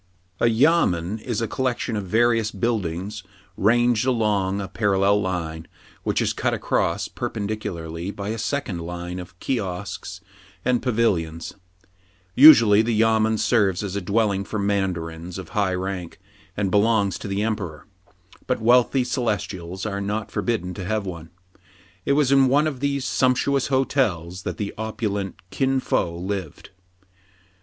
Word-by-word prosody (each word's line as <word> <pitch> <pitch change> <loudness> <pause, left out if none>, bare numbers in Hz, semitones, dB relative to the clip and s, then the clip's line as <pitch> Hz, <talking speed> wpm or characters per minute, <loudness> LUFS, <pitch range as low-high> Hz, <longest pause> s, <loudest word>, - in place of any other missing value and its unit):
A - - +3
YAMEN 110 - +2
is 115 0 -3
a - - -1
collection 125 -1 -2
of 100 -3 -3
various 115 +1 +2
buildings 100 -2 -2 0.3
ranged 120 +2 +3
along 105 -5 +1
a 100 - -4
parallel 100 -1 +2
line, 85 -4 -3 0.3
which - - 0
is - - 0
cut - - 0
across - - 0
perpendicularly 90 -5 -4
by 100 0 -5
a 110 +1 -3
second 115 -6 -2
line 90 +1 -5
of 90 0 -11
kiosks 95 -6 -4 0.5
and 125 -1 +2
pavilions. 90 -10 0 0.8
Usually 115 -7 +8
the 115 0 0
yamen 110 0 +3
serves 105 -4 +2
as 100 -1 -4
a 100 - -1
dwelling 100 0 +1
for 110 - -5
mandarins 90 -4 -2
of 95 -3 -8
high 100 -3 0
rank, 90 -2 -5 0.4
and 100 -2 0
belongs 105 -1 +2
to - - -6
the 100 +1 -1
emperor; 95 -9 -3 0.6
but - - 0
wealthy 125 +3 +4
celestials 100 -7 -3
are 100 -1 -2
not 105 +2 -3
forbidden 90 -7 -2
to 95 - -6
have 105 +1 -1
one. 85 -3 -7 0.8
It 140 - +4
was 140 -2 +3
in 135 -1 +5
one 145 +4 +3
of 145 -5 -2
these 140 -1 -1
sumptuous 130 +2 +1
hotels 105 - 0
that - - -5
the 100 -1 -4
opulent 105 -3 -3
Kin 135 -1 +1
Fo 85 -8 -1
lived. 95 -3 -5
105 Hz, 145 wpm, -23 LUFS, 90-115 Hz, 0.8 s, Usually